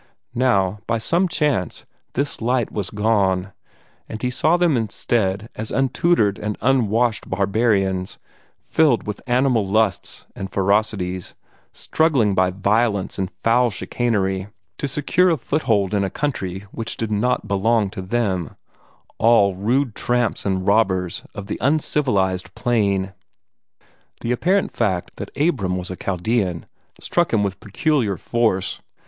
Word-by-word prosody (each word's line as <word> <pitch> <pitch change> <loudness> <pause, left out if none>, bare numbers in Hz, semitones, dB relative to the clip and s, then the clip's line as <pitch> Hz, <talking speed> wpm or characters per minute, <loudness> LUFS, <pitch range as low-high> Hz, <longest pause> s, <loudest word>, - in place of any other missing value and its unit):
Now, 105 -6 +1
by 115 - +1
some 170 +11 +1
chance, 150 - -1 0.3
this 140 0 -2
light 120 0 0
was 100 -2 -3
gone, 100 -3 +1 0.6
and 110 - -5
he 125 +1 -1
saw 160 +7 +2
them 175 -4 +3
instead 110 -2 -1
as 110 0 -5
untutored 135 - +2
and 105 0 -3
unwashed 120 -3 +1
barbarians, 95 -1 0 0.5
filled 150 -7 +2
with 105 -1 -5
animal 125 -2 +2
lusts 100 0 0
and 95 - -5
ferocities, 95 -2 0 0.4
struggling 135 -11 +1
by 95 -1 +3
violence 100 +1 0
and 95 -1 -1
foul 120 +2 +4
chicanery 100 -4 -1 0.3
to 145 - -1
secure 150 +6 +2
a 165 - +2
foothold 110 -8 0
in 100 -1 +2
a 95 - -1
country 95 -11 -3
which 115 -1 -5
did 115 -1 -3
not 115 +5 0
belong 100 +1 +1
to 105 -2 -6
them 95 -5 -1 0.6
all 110 -4 +5
rude 120 +6 0
tramps 120 -3 0
and 95 -1 -1
robbers 95 -4 +1
of 100 - -6
the - - -5
uncivilized 125 -10 +1
plain. 100 -6 0 1.1
The 115 - -2
apparent 185 +10 +1
fact 95 -7 -2
that - - -6
Abram 115 - +1
was 90 0 -5
a - - -4
Chaldean 95 -1 -1 0.3
struck 175 -1 +1
him 105 -3 +2
with 95 -1 -3
peculiar 110 - 0
force. 110 -2 0
110 Hz, 135 wpm, -21 LUFS, 95-125 Hz, 1.1 s, all